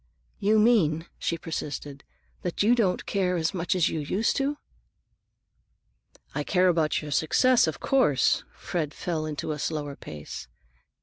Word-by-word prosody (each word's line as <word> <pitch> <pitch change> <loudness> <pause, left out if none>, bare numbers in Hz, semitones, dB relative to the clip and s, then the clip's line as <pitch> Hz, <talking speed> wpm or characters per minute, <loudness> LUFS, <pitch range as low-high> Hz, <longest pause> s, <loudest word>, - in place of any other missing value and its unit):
"You 210 +2 +3
mean," 185 -9 +3
she 170 - -1
persisted, 145 -3 -5 0.4
"that 180 +2 -1
you 225 +4 +5
don't 205 -7 +1
care 185 -2 0
as 165 +2 0
much 180 0 -1
as 175 -3 +3
you 160 - -2
used 190 +9 0
to?" 280 +1 0 1.8
"I - - -2
care 185 -1 +3
about 160 -3 +1
your 150 - -6
success, 235 - +4
of 160 - -3
course." 195 - +3
Fred 155 -4 -3
fell 160 -3 -2
into 155 +1 -3
a 150 - -4
slower 145 -2 -3
pace. 75 - -8
165 Hz, 145 wpm, -27 LUFS, 150-200 Hz, 1.8 s, you